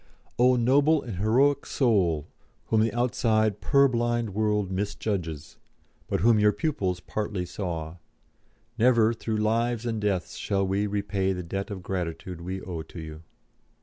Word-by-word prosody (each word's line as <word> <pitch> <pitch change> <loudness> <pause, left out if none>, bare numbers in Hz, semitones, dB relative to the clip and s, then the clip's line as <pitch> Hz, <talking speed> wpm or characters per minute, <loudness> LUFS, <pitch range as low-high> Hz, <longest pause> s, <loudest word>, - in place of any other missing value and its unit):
O 125 +1 +5
noble 140 +6 +3
and 115 -7 -6
heroic 130 +8 +3
Soul, 95 - +1 0.4
whom 110 -1 +3
the 110 - +2
outside 110 -3 +1
purblind 120 -5 +2
world 105 -1 0
misjudges, 95 -6 -3 0.5
but - - -1
whom 115 +1 +5
your 105 0 +5
pupils 100 - -1
partly 105 -3 -3
saw, 85 -3 -5 0.8
never 115 -1 +4
through 110 -1 -3
lives 115 +2 0
and 115 -2 -2
deaths 100 -4 -1
shall 100 -1 0
we 100 +2 0
repay 100 -1 -1
the 90 -1 -5
debt 95 +5 -4
of 95 -3 -6
gratitude 90 -1 -4
we 95 +2 -4
owe 85 -3 -5
to 85 - -10
you. 80 -1 -8
105 Hz, 145 wpm, -26 LUFS, 90-115 Hz, 0.8 s, O